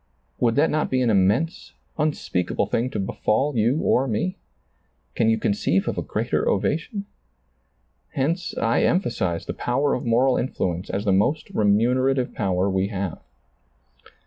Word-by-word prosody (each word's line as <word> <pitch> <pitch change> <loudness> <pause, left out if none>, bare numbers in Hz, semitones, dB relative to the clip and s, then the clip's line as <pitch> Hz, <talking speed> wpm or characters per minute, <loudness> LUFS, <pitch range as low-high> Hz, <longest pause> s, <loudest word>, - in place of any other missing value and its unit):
Would 115 -2 +2
that 150 +3 +3
not 155 0 0
be 130 -1 +1
an 120 - +2
immense, 105 - +1 0.2
unspeakable 150 - -1
thing 120 +3 -1
to 130 - -4
befall 130 +8 0
you 120 +7 +2
or 135 +2 +2
me? 130 - -1 0.8
Can 115 - +2
you 110 - +3
conceive 95 -3 0
of - - -1
a - - -2
greater - - -1
ova - - +1
tion? 200 +5 -6 1.1
Hence 165 +6 -1
I 115 0 +2
emphasize 105 - 0
the - - -4
power 140 +4 0
of 125 - -2
moral 125 +2 +3
influence 90 -8 -2
as 100 +2 -2
the 100 - +3
most 120 +11 +1
remunerative 125 +5 +2
power 95 -5 0
we 95 0 0
have. 100 -4 -4
120 Hz, 150 wpm, -23 LUFS, 100-140 Hz, 1.1 s, that